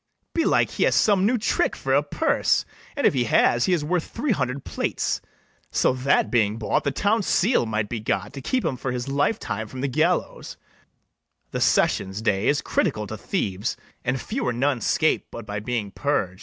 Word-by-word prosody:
Belike 330 - +2
he - - 0
has - - +2
some 200 -2 +4
new 245 +2 +2
trick 220 - 0
for - - -2
a - - +5
purse; - - +1 0.3
An 285 - 0
if - - +5
he 125 -3 +1
has, 120 +2 +3
he - - 0
is 155 -4 0
worth 175 +1 0
three 250 +3 -2
hundred 135 - -2
plates, - - -2 0.5
So - - +2
that, 130 +2 +1
being 110 -3 +2
bought, 105 -3 0
the 140 - +1
town 210 +7 +1
seal 190 - +2
might 105 -1 -1
be 115 +1 -4
got 105 0 -2
To 140 - -7
keep 255 - -1
him 130 - -1
for 130 - -3
his 125 0 -3
life 145 +10 +1
time 110 - -4
from 130 +4 -7
the 140 - 0
gallows: 155 +7 -1 0.9
The - - -3
sessions 95 +2 +2
day 100 -2 +1
is 145 - +2
critical - - 0
to - - -6
thieves, 100 +4 -2 0.3
And 130 +1 -1
few 240 - -3
or 125 - +1
none 130 +1 0
scape 155 +7 +1
but 115 - -8
by 105 -1 -4
being 105 -2 -3
purg'd. 95 -11 -1
130 Hz, 200 wpm, -24 LUFS, 110-170 Hz, 0.9 s, a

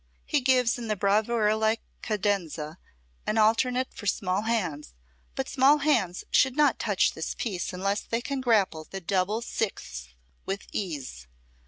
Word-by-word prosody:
He 295 - +1
gives 250 -2 +3
in 235 - -5
the 215 - 0
bravura 210 +2 +2
like 220 +1 +1 0.2
cadenza, 185 -7 -2 0.5
an 215 - 0
alternate 250 +4 +2
for 205 - -7
small 185 0 0
hands, 180 - -2 0.4
but - - -2
small 275 +2 +5
hands 235 - +1
should 265 -1 +4
not 295 -4 +3
touch 200 -4 +2
this 160 - -4
piece 190 -7 -3
unless 195 +3 -1
they 230 - -2
can 275 -1 -3
grapple 200 -10 +2
the 195 - -5
double 195 +5 0
sixths 65 - -4 0.3
with 195 +1 -4
ease. 140 - -5
210 Hz, 150 wpm, -27 LUFS, 185-235 Hz, 0.5 s, small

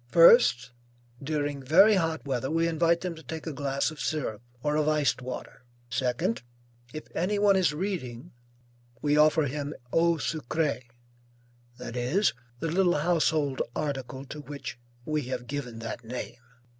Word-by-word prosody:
First, 165 - +6 0.5
during 145 -1 -2
very 185 +11 +6
hot 165 -5 0
weather, 130 -1 -1
we 165 +1 +2
invite 170 +1 +2
them 180 -2 -3
to 160 - -12
take 160 +2 -7
a 160 - -4
glass 140 +1 -1
of 155 - -11
syrup, 130 -10 -2 0.2
or 150 0 +1
of 155 0 +1
iced 150 -3 +1
water. 125 0 -7 0.3
Second, 125 0 0 0.5
if 155 - -6
any 195 +5 0
one 200 -1 +4
is 185 -6 +3
reading, 150 - -4 0.7
we 145 0 +3
offer 155 +1 +5
him 145 +1 -3 0.2
eau 170 +1 +4
sucrée, 150 -3 -2 0.9
that 125 -1 -7
is, 130 +12 +2 0.3
the 165 +2 -2
little 180 -1 +3
household 155 -3 +1
article 135 -2 -3
to 150 +2 -8
which 140 -3 -7 0.3
we 155 -1 0
have 125 -1 -4
given 130 -4 -5
that 115 +1 -6
name. 125 +3 -6
150 Hz, 150 wpm, -28 LUFS, 130-165 Hz, 0.9 s, First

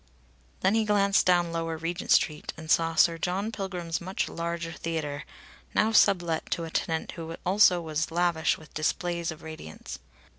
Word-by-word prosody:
Then 190 +2 +3
he 225 0 +3
glanced 200 -2 +3
down 175 -2 +3
Lower 165 -1 -2
Regent 165 +2 -4
Street 150 -1 +2
and 160 0 -5
saw 165 0 +3
Sir 165 0 +4
John 190 +6 -1
Pilgrim's 180 -6 -4
much 185 +3 -2
larger 170 0 -4
theatre, 155 -3 -4 0.5
now 220 - +3
sublet 175 -6 +3
to 170 - -1
a 165 - -6
tenant 160 0 -1
who 165 -1 -7
also 185 -1 +5
was 160 -1 -2
lavish 170 -1 +1
with 155 - -16
displays 170 +2 -1
of 160 0 -7
radiance. 155 - -8
170 Hz, 160 wpm, -28 LUFS, 160-180 Hz, 0.5 s, also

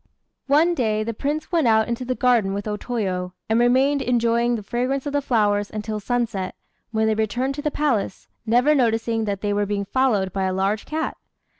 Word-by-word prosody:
One 310 +5 +4
day 215 -7 0
the 230 +1 -3
Prince 290 +9 -3
went 330 -7 +2
out 220 -1 +4
into 235 +1 -3
the 255 0 -2
garden 235 -7 +2
with 205 +1 -4
O 210 - -1
Toyo, 185 -6 -3
and 225 +1 +2
remained 265 +4 +3
enjoying 235 -1 +2
the 215 - -5
fragrance 255 +6 -2
of 285 - -3
the 285 - +1
flowers 205 -6 +1
until 215 0 -4
sunset, 225 -4 -2 0.3
when 220 -1 0
they 220 - +2
returned 240 +5 -1
to 290 - -5
the 300 - 0
palace, 265 -11 -1 0.2
never 245 +6 +3
noticing 225 -3 +1
that 200 -2 -3
they 205 -1 0
were 205 0 0
being 200 0 -2
followed 210 -6 +1
by 195 -1 -1
a 185 - 0
large 195 +3 -1
cat. 315 +1 -3
230 Hz, 200 wpm, -23 LUFS, 205-260 Hz, 0.3 s, One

